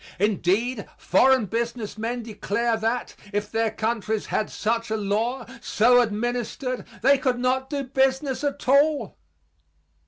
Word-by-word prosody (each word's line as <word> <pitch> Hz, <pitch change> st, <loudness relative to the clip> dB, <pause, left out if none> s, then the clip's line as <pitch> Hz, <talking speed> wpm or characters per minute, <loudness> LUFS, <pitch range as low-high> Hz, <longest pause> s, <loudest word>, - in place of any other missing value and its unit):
Indeed, 205 Hz, +4 st, 0 dB
foreign 260 Hz, +5 st, +4 dB
business 230 Hz, +1 st, -3 dB
men 230 Hz, +2 st, -3 dB
declare 230 Hz, +1 st, -1 dB
that, 225 Hz, +2 st, -2 dB, 0.2 s
if 205 Hz, 0 st, -2 dB
their 225 Hz, 0 st, +1 dB
countries 220 Hz, -1 st, -2 dB
had 215 Hz, -, -1 dB
such 230 Hz, +1 st, -1 dB
a 220 Hz, -, 0 dB
law, 225 Hz, +5 st, -1 dB, 0.2 s
so 245 Hz, +4 st, +4 dB
administered, 240 Hz, +3 st, -2 dB, 0.2 s
they 275 Hz, +1 st, +5 dB
could 255 Hz, -2 st, 0 dB
not 260 Hz, +2 st, 0 dB
do 285 Hz, -2 st, -2 dB
business 265 Hz, +1 st, 0 dB
at 285 Hz, -1 st, -3 dB
all. 280 Hz, -, +3 dB
235 Hz, 130 wpm, -24 LUFS, 215-260 Hz, 0.2 s, they